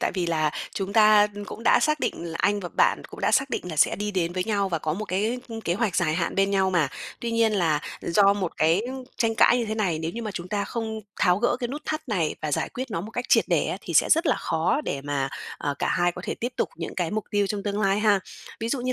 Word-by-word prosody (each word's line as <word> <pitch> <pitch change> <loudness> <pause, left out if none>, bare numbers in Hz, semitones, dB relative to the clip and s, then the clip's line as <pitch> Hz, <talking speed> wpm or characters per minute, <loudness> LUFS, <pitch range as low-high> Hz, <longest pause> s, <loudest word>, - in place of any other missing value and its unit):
tại - - 0
vì 180 -3 -1
là 155 -2 +1 0.2
chúng 195 0 -3
ta 215 -1 +6 0.2
cũng 230 - -8
đã - - +5
xác 305 -1 +1
định 170 - -2
là 165 -1 -5
anh 205 0 +2
và 175 - -5
bạn - - +2
cũng - - -11
đã - - +2
xác 270 0 +2
định - - -2
là 155 - -6
sẽ 150 - +4
đi 210 +1 -2
đến 175 -3 -1
với 185 0 -1
nhau 200 -3 0
và 165 - -1
có 155 0 -2
một 210 +6 -3
cái, 215 +6 -1
ưm, 225 -1 -6
kế 175 -4 -1
hoạch 210 -4 0
dài 155 -4 +2
hạn 170 0 -1
bên 195 0 +2
nhau 190 -1 +2
mà. 170 -6 +2 0.3
Tuy 235 - -2
nhiên 230 -1 +2
là 165 -7 +2 0.2
do 200 +3 +4
một 190 -4 -3
cái 165 +6 +3 0.3
tranh 225 -1 +1
cãi 245 - +5
như 235 - 0
thế 220 0 -3
này, 185 -7 0
nếu 160 +1 -3
như 235 +4 -6
mà 215 - -3
chúng 180 -2 -6
ta 205 0 -1
không 220 -2 -4 0.2
tháo 180 0 +4
gỡ 240 +2 +1
cái 240 - -2
nút 295 +3 -6
thắt 310 -3 -4
này 175 -8 0
và 150 - -2
giải - - 0
quyết 255 0 -6
nó 195 - -2
một 210 +5 -7
cách 245 +2 -3
triệt - - +5
để - - +2
á, - - -2
thì - - -6
sẽ - - +5
rất 330 +2 +4
là - - +3
khó 165 - 0
để 140 - -2
mà, 140 -1 -1 0.3
à, 145 - -2
cả - - 0
hai 175 0 +2
có 180 - -8
thể - - -2
tiếp 240 +2 -4
tục - - 0
những 165 - -5
cái 175 -3 -1
mục 215 0 -2
tiêu 205 -1 +2
trong 200 0 -3
tương 205 0 -2
lai 195 0 +2
ha. 205 -3 +4 0.4
Ví 225 - -2
dụ 260 0 -1
như 255 +1 -1
200 Hz, 290 wpm, -25 LUFS, 170-225 Hz, 0.4 s, ta